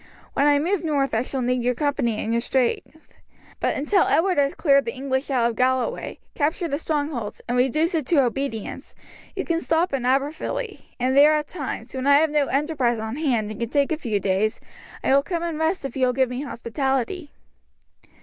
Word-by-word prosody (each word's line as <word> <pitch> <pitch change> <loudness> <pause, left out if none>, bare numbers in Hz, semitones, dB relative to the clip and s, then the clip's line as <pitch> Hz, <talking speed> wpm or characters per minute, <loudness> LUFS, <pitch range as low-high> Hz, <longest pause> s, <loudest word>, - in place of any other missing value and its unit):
When 280 - +3
I 290 -1 +5
move 350 +5 0
north 285 -5 0
I 225 - +2
shall 260 +1 -3
need 250 0 +1
your 250 +1 +1
company 270 -5 0
and 225 - -2
your 235 - +1
strength; 260 +5 -2 0.4
but - - 0
until 355 +7 +2
Edward 360 -1 +2
has 280 0 +1
cleared 275 -3 +3
the 230 - -4
English 265 +1 -2
out 250 -4 +2
of 235 - -3
Galloway, 260 - 0 0.2
captured 320 +2 -1
the 285 - -1
strongholds, 290 -9 -3
and 245 - -1
reduced 305 +8 +2
it 310 -6 -1
to 295 -6 +4
obedience, 245 -3 -4 0.4
you - - -3
can 335 -1 0
stop 330 0 +1
in 265 -3 -1
Aberfilly, 310 - -1
and 255 +2 +1
there 295 +2 +7
at 300 -1 -1
times, 260 -8 -6
when 260 +1 -2
I 285 - +7
have 310 +1 +3
no 295 -2 +2
enterprise 275 -4 0
on 220 +3 -4
hand 240 -9 0
and 215 - -8
can 235 -1 -2
take 280 +2 +1
a - - +2
few 230 -9 -2
days, 195 +3 0 0.4
I - - +3
will 280 - +6
come 340 +3 -3
and 330 -2 -3
rest 320 0 0
if 270 - -5
you 260 -1 +2
will 250 - +1
give 260 0 +2
me 250 +1 -4
hospitality." 270 +5 -2
275 Hz, 205 wpm, -23 LUFS, 250-310 Hz, 0.4 s, there